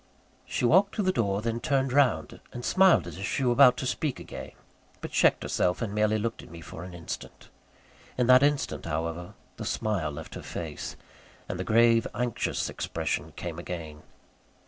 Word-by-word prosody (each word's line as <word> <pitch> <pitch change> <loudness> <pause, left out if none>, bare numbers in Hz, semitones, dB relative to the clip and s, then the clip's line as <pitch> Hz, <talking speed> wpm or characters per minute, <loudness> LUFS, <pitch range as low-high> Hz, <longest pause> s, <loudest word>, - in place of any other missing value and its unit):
She - - -1
walked 190 +10 +4
to 210 - 0
the 185 - +3
door, 100 - 0
then 115 0 -1
turned 135 0 0
round, 125 - +2
and 120 - -7
smiled 190 - +5
as 85 +1 -8
if 95 - -3
she 135 - -1
were 125 - +3
about 125 +1 +6
to - - -3
speak 130 +2 -2
again; - - -8 0.5
but - - -7
checked - - +3
herself, 90 0 0
and 110 -3 -3
merely 105 +1 +2
looked 115 +2 -3
at - - -14
me 85 +1 -10
for 80 +1 -9
an 90 -1 -9
instant. 85 - -8 0.7
In 125 - +2
that 125 +1 +7
instant, 145 0 0
however, 85 +3 -3 0.2
the - - -5
smile 100 -8 -1
left 75 +2 -8
her - - -7
face, - - -6 0.5
and 90 - -4
the - - -1
grave, 115 +3 +4
anxious 120 -2 -1
expression - - -3
came 85 -1 -6
again. 80 -4 -7
110 Hz, 185 wpm, -28 LUFS, 85-125 Hz, 0.7 s, that